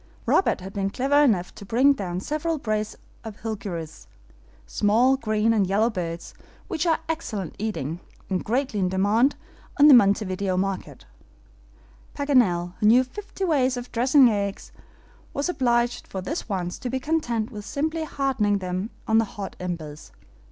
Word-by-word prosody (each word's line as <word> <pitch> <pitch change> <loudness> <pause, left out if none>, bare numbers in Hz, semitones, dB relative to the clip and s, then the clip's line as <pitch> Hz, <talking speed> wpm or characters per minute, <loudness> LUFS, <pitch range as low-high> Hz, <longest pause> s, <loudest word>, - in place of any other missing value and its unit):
Robert 380 - +2
had 190 +1 -8
been 195 -1 -1
clever 270 +7 +1
enough 205 -11 +2
to - - -11
bring 250 +7 +4
down 180 -7 -4
several 310 +6 -2
brace 215 -4 -2 0.3
of 220 -3 -9
HILGUEROS, 195 -8 -6 0.6
small 220 - +3
green 215 -3 +1
and 205 -4 +2
yellow 215 +5 +2
birds, 170 -4 -5 0.3
which 340 -3 -2
are 320 -1 +2
excellent 245 - -4
eating, 175 -7 -3 0.3
and 185 -2 -2
greatly 250 -1 -1
in 185 -1 +1
demand 205 +8 +2 0.4
in 290 - +8
the 295 - +9
Montevideo 200 -4 +3
market. 195 0 -3 1.1
Paganel, 215 -12 +2
who 210 - +3
knew 245 +4 +6
fifty 390 +8 -8
ways 265 -7 +2
of 245 0 -7
dressing 260 +3 +5
eggs, 200 -3 -2 0.6
was 285 +5 -1
obliged 240 -6 0
for 190 - -5
this 270 - -4
once 180 -3 -3
to 250 - -4
be 260 +2 -1
content 250 -7 -1
with 210 -3 -7
simply 315 +7 -2
hardening 265 -9 0
them 185 +2 -3 0.2
on 220 0 +4
the 225 - +2
hot 200 -1 -5
embers. 160 -4 -6
220 Hz, 155 wpm, -24 LUFS, 195-265 Hz, 1.1 s, the